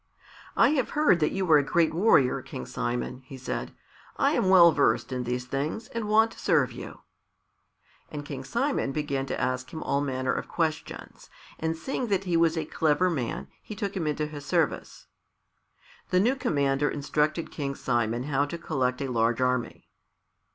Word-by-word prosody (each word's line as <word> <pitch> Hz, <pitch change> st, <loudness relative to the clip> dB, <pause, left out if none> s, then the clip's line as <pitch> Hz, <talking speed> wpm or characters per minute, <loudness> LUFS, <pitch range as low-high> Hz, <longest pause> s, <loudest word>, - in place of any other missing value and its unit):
"I -, -, +6 dB
have 275 Hz, -4 st, +1 dB
heard 295 Hz, -, +4 dB
that 150 Hz, -, +1 dB
you 190 Hz, -1 st, -2 dB
are 150 Hz, -, +8 dB
a -, -, +1 dB
great 160 Hz, +4 st, +2 dB
warrior, 165 Hz, -, +3 dB
King 65 Hz, -, -7 dB
Simon," 125 Hz, -, -3 dB
he 130 Hz, +1 st, -10 dB
said. 130 Hz, -, -4 dB, 0.5 s
"I -, -, +3 dB
am 185 Hz, -, +1 dB
well 175 Hz, -3 st, +8 dB
versed 145 Hz, -2 st, +1 dB
in 125 Hz, -1 st, -3 dB
these 125 Hz, +1 st, -2 dB
things 145 Hz, -, -3 dB
and 230 Hz, -2 st, -4 dB
want 220 Hz, +1 st, +4 dB
to -, -, -13 dB
serve -, -, +2 dB
you." -, -, -9 dB, 1.1 s
And 145 Hz, -1 st, -6 dB
King 135 Hz, -2 st, -6 dB
Simon 235 Hz, -, -1 dB
began 140 Hz, -2 st, -2 dB
to -, -, -3 dB
ask 130 Hz, 0 st, -2 dB
him 160 Hz, -, -6 dB
all 140 Hz, 0 st, 0 dB
manner 130 Hz, -2 st, -1 dB
of -, -, -4 dB
questions, 160 Hz, -2 st, -4 dB, 0.3 s
and 160 Hz, 0 st, -1 dB
seeing 250 Hz, +7 st, -3 dB
that 195 Hz, -3 st, 0 dB
he 180 Hz, -3 st, -1 dB
was 165 Hz, 0 st, +3 dB
a 160 Hz, -, -1 dB
clever 160 Hz, +4 st, +1 dB
man, 130 Hz, -8 st, -3 dB
he 215 Hz, -, -8 dB
took 200 Hz, -2 st, -4 dB
him 170 Hz, -5 st, -2 dB
into 150 Hz, 0 st, -1 dB
his 150 Hz, -1 st, -8 dB
service. -, -, -1 dB, 1.0 s
The 180 Hz, -, +3 dB
new 240 Hz, +7 st, +3 dB
commander 140 Hz, -, +1 dB
instructed 150 Hz, +3 st, -1 dB
King 140 Hz, -2 st, -4 dB
Simon 120 Hz, -2 st, -1 dB
how 140 Hz, 0 st, +1 dB
to 170 Hz, +4 st, -6 dB
collect 130 Hz, -5 st, -1 dB
a -, -, -2 dB
large 115 Hz, 0 st, +1 dB
army. 125 Hz, -1 st, -1 dB
150 Hz, 180 wpm, -27 LUFS, 130-175 Hz, 1.1 s, are